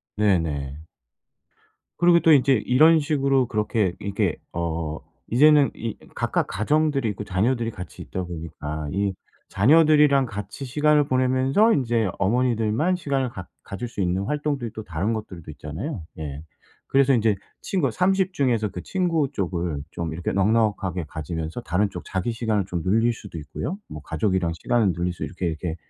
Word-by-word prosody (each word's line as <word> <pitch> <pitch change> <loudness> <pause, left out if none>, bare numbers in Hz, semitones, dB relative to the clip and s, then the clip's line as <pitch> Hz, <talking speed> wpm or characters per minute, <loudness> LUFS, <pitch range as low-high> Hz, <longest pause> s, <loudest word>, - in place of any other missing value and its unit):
네네. 80 -8 0 1.1
그리고 175 0 +5
또 165 - +4
인제 135 -2 +5
이런 155 +6 +6
식으로 140 -4 +1
그렇게 105 -3 0
이게 100 -4 -1 0.2
어 80 -2 -3 0.3
이제는 145 +3 +6
이 115 -1 -5 0.2
각각 - - 0
가정들이 140 +4 +1
있고 105 0 -4
자녀들이 115 +5 0
같이 90 -4 -9
있다 95 - -4
보니까 80 -3 -6
이 100 0 0 0.4
자녀들이랑 150 +3 +5
같이 105 +3 -7
시간을 150 +3 +3
보내면서 130 - +3
인제 115 -6 +1
어머니들만 120 - +1
시간을 135 -6 -1
갖 90 -6 -9 0.2
가질 110 +5 -6
수 115 -3 -5
있는 90 +1 0
활동들이 145 -1 -2
또 110 - -6
다른 95 +4 -2
것들도 95 -7 -7
있잖아요. 80 - -6 0.2
예. 75 -2 -5 0.5
그래서 135 0 +4
인제 110 -4 +3 0.3
친구가 160 -10 0
30 190 - +1
중에서 120 - +1
그 90 - -7
친구 170 -6 0
쪽을 85 -5 -2
좀 85 -2 -4
이렇게 85 +1 -3
넉넉하게 100 -4 +1
가지면서 80 - -5
다른 100 -1 0
쪽 - - -8
자기 95 +5 -2
시간을 110 -4 -1
좀 90 -2 -3
늘릴 115 +5 +3
수도 100 -6 -9
있고요. 80 - -5
뭐 75 - -8
가족이랑 85 +2 0
시간을 110 -6 +2
늘릴 90 +2 -1
수 - - -7
이렇게, 90 -1 -4
이렇게 80 0 -3
110 Hz, 345 characters per minute, -24 LUFS, 90-135 Hz, 1.1 s, 이런